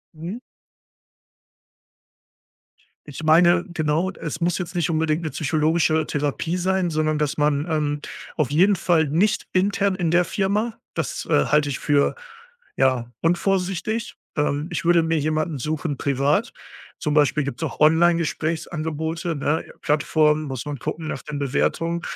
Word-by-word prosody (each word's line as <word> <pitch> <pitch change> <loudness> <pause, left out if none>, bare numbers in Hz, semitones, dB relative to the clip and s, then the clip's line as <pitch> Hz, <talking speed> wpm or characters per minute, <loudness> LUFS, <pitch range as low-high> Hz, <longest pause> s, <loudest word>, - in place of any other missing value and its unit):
Mhm. 170 +9 -6 2.7
Ich 145 +1 -8
meine, 170 +3 +5
genau, 160 +2 0
es 165 -3 -6
muss 175 0 +1
jetzt 180 -1 -5
nicht 175 -2 0
unbedingt 160 0 +1
'ne 160 - -3
psychologische 155 0 +1
Therapie 150 +4 -1
sein, 185 0 0
sondern 155 -1 0
dass 150 +1 -1
man, 145 +1 +1
ähm 150 -2 0 0.4
auf 150 -4 0
jeden 185 +7 +4
Fall 165 -3 +2
nicht 185 +9 +1
intern 200 +1 +2
in 180 -3 -1
der 175 +2 +3
Firma. 210 +4 -1 0.2
Das, - - -3
äh, 70 - +3
halte 150 -1 +2
ich 135 - -2
für, 145 -1 +2 0.6
ja, 125 -3 +1
unvorsichtig. 190 +5 0 0.2
Ähm, 150 +1 -1
ich 160 -1 -3
würde 170 -1 +5
mir 165 -1 +1
jemanden 155 0 -1
suchen 150 +1 -2
privat. 140 +2 +1 0.5
Zum 150 - -2
Beispiel 150 0 +3
gibt's 140 +3 -5
auch 160 - -4
Online-Gesprächsangebote, 160 0 +1
ne, 145 +2 -1 0.2
Plattformen, 150 +1 +2
muss 130 -4 -5
man 145 -2 -5
gucken 160 +6 -4
nach - - -4
den 150 - -6
Bewertungen, 165 +5 0
160 Hz, 140 wpm, -23 LUFS, 150-175 Hz, 2.7 s, meine